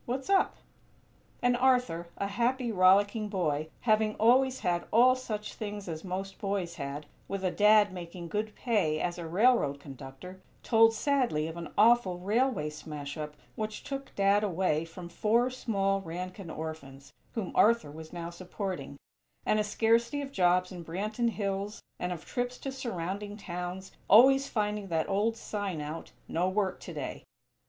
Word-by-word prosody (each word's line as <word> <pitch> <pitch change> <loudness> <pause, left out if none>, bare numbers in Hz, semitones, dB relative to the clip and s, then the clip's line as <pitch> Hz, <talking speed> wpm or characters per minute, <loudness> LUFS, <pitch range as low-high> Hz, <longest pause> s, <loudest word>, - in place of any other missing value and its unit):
What's 260 +8 -2
up?" 390 - +3 0.9
And 245 0 +4
Arthur, 250 -10 +2
a 200 - -1
happy, 240 +4 0
rollicking 205 +3 +4
boy, 155 -6 -1
having 215 -2 +2
always 255 +4 +4
had 175 -1 0
all 245 +3 +6
such 215 -5 -5
things 205 -2 -6
as 160 -2 -5
most 190 +1 -5
boys 195 -4 -2
had, 140 0 -5 0.2
with 195 -1 -4
a 185 - +1
Dad 210 -1 +5
making 175 -1 -7
good 210 +2 -2
pay 190 -11 +1
as 175 +1 -2
a 170 - -5
railroad 180 - +3
conductor, 140 +7 -10 0.2
told 225 -1 +5
sadly 250 - +1
of 160 0 -5
an 170 -3 -7
awful 220 -4 +5
railway 205 - 0
smash 150 -1 -7
up 150 -1 -6 0.2
which 215 0 -4
took 275 -1 -6
"Dad" 200 +1 +3
away 175 -5 +1
from 170 +2 -9
four 225 +8 +2
small 195 -6 0
Rankin 180 +1 -6
orphans, 140 -4 -7 0.2
whom 215 -6 -3
Arthur 230 -8 +4
was 160 +1 -10
now 170 -1 -5
supporting; 180 -5 -5 0.5
and 215 - +3
a - - +3
scarcity 230 +5 +2
of 275 - -7
jobs 180 -3 +2
in 175 -2 -7
Branton 215 +8 -1
Hills 200 -1 -3 0.2
and 180 - -2
of 170 -2 -6
trips 245 0 -3
to 270 - -5
surrounding 205 -4 -4
towns, 180 0 -6 0.2
always 270 +6 +7
finding 210 -2 -1
that 160 -3 0
old 210 +4 +1
sign 205 -7 -4
out: 150 +2 -6 0.2
"No 175 +3 0
Work 190 -1 0
Today." - - -6
195 Hz, 160 wpm, -30 LUFS, 170-225 Hz, 0.9 s, always